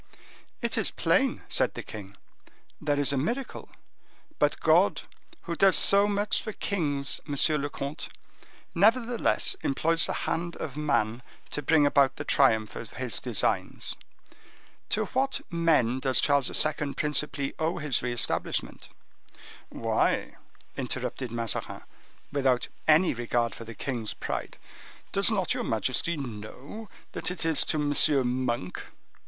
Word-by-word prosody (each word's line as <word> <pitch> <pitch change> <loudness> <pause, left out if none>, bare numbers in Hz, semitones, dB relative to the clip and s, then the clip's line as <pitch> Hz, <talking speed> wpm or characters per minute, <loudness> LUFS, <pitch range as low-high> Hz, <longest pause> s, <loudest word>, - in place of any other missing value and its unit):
"It - - +1
is - - +2
plain," - - +1
said - - +1
the - - -5
king, 100 -2 -10 0.6
"there 145 -1 0
is 140 0 +2
a - - 0
miracle; 240 - -3 0.7
but - - +2
God, - - +3 0.4
who 170 - -4
does 195 +2 +5
so 200 +1 +6
much 205 +1 +1
for 215 - -6
kings, 145 -10 0
monsieur 145 +2 +3
le 145 +1 -2
comte, 140 +1 -5 0.6
nevertheless 230 - +2
employs 165 +5 +3
the - - -3
hand 170 +1 -2
of 140 -4 -6
man 125 -6 0 0.3
to 150 - -2
bring 150 +1 +4
about 140 -1 +3
the 145 - -5
triumph 110 -8 +2
of - - -8
His - - -2
designs. - - -1 0.9
To 215 0 +1
what 265 +5 -1
men 155 -8 +2
does 130 -1 +2
Charles 140 -2 +3
II. 145 -2 +1
principally 150 -1 0
owe 160 +2 0
his 150 -5 0
re 125 - -2
establishment?" 120 - -1 0.8
"Why," - - 0 0.4
interrupted 130 -4 -3
Mazarin, 115 -2 -3 0.5
without 135 -3 +1 0.2
any 160 +3 +5
regard 120 0 -1
for 115 - -9
the 115 0 -9
king's 120 -5 -4
pride—"does 195 +2 -4
not 195 -6 +1
your - - -3
majesty 130 - -1
know 130 - -8 0.2
that - - -2
it 180 -2 -3
is 160 -2 +3
to - - 0
M. 140 -3 +2
Monk?" 120 -7 -3
145 Hz, 135 wpm, -27 LUFS, 125-170 Hz, 0.9 s, so